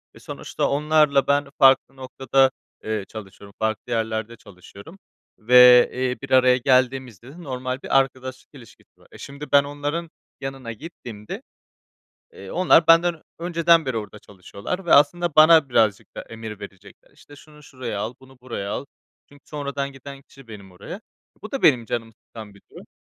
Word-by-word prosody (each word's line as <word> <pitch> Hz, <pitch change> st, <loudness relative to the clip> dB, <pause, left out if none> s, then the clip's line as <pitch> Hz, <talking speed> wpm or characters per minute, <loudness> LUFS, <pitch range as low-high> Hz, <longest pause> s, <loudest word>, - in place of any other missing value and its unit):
ve -, -, -15 dB
sonuçta -, -, -4 dB
onlarla 150 Hz, -1 st, +2 dB
ben 140 Hz, 0 st, +1 dB
farklı 135 Hz, -1 st, +4 dB
noktada, 130 Hz, 0 st, +1 dB, 0.3 s
eee, 110 Hz, -2 st, -3 dB
çalışıyorum, 100 Hz, -1 st, -12 dB
farklı 110 Hz, +2 st, -3 dB
yerlerde 110 Hz, 0 st, -3 dB
çalışıyorum 100 Hz, -, -15 dB, 0.4 s
ve, 125 Hz, +2 st, +7 dB
eee, 130 Hz, 0 st, -2 dB
bir 135 Hz, -1 st, -9 dB
araya 130 Hz, -1 st, +5 dB
geldiğimizde 130 Hz, -2 st, 0 dB
de 175 Hz, +1 st, -13 dB
normal 130 Hz, -1 st, -5 dB
bir -, -, +1 dB
arkadaşlık 130 Hz, -1 st, -5 dB
ilişkisi 125 Hz, -5 st, -18 dB
var. -, -, -23 dB
E, -, -, -14 dB
şimdi 140 Hz, +2 st, -10 dB
ben 140 Hz, 0 st, +5 dB
onların 145 Hz, +4 st, -5 dB, 0.3 s
yanına 135 Hz, -3 st, -6 dB
gittiğimde, 115 Hz, -5 st, -10 dB, 0.9 s
eee, 95 Hz, -, -12 dB
onlar 175 Hz, -2 st, +3 dB
benden 165 Hz, -1 st, +4 dB, 0.2 s
önceden 170 Hz, -2 st, +2 dB
beri 130 Hz, -, -2 dB
orada 105 Hz, -1 st, -6 dB
çalışıyorlar 105 Hz, -, -8 dB
ve -, -, +2 dB
aslında 170 Hz, +3 st, +3 dB
bana 155 Hz, -2 st, +6 dB
birazcık 110 Hz, -4 st, +1 dB
da -, -, -6 dB
emir 110 Hz, -2 st, -10 dB
verecekler. 100 Hz, 0 st, -14 dB
İşte, 145 Hz, -, -18 dB
şunu 150 Hz, 0 st, -18 dB
şuraya 125 Hz, -7 st, -6 dB
al, 110 Hz, +4 st, -5 dB
bunu 130 Hz, -1 st, -19 dB
buraya 115 Hz, -5 st, -6 dB
al. -, -, -4 dB, 0.4 s
Çünkü 145 Hz, 0 st, -20 dB
sonradan 140 Hz, -2 st, -5 dB
giden 140 Hz, 0 st, -12 dB
kişi 135 Hz, -3 st, -18 dB
benim 100 Hz, -4 st, -12 dB
oraya. 100 Hz, -, -10 dB, 0.4 s
Bu 215 Hz, -, -10 dB
da 275 Hz, -, -4 dB
benim 125 Hz, -6 st, +4 dB
canımı 115 Hz, 0 st, -5 dB
sıkan 110 Hz, -3 st, -12 dB
bir 100 Hz, -, -20 dB
durum. -, -, -14 dB
130 Hz, 160 wpm, -22 LUFS, 110-145 Hz, 0.9 s, ve